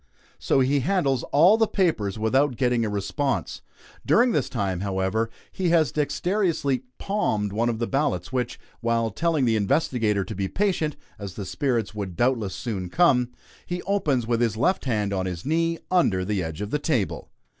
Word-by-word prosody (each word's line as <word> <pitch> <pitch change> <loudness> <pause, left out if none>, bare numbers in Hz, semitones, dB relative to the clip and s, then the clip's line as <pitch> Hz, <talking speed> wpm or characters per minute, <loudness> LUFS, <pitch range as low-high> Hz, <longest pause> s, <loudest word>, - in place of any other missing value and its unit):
So 135 - +2
he 140 +2 +2
handles 140 -4 +1
all 175 +9 +6
the 225 -1 +3
papers 135 - 0
without 130 +5 +2
getting 125 -2 +1
a 110 - -1
response. 120 +7 -2 0.4
During 245 +2 +4
this 145 - 0
time, 100 -6 -2
however, 100 +3 -1 0.2
he 185 -2 -1
has 160 -6 +3
dexterously 150 - 0
"palmed" 105 - -1
one 115 +3 +1
of 115 - -1
the 115 - -1
ballots, 125 - -1
which 125 -2 -2 0.2
while 115 -1 0
telling 155 +3 +1
the 115 -2 +2
investigator 110 -4 +1
to 110 - -6
be 100 -1 -2
patient, 175 - 0 0.2
as 100 -3 -7
the 100 - -5
spirits 115 -1 -1
would 100 -4 -5
doubtless 115 -5 0
soon 95 -3 -4
come 125 - +3 0.3
he 175 0 -4
opens 150 - 0
with 115 0 0
his 115 -2 +1
left 185 +9 +1
hand, 105 -5 0
on 95 -1 -1
his 90 -2 -5
knee, 165 +2 +1
under 95 - +2
the 100 -1 -1
edge 80 +1 -5
of 105 +1 -4
the 150 - 0
table. 130 - -1
120 Hz, 175 wpm, -25 LUFS, 105-155 Hz, 0.4 s, all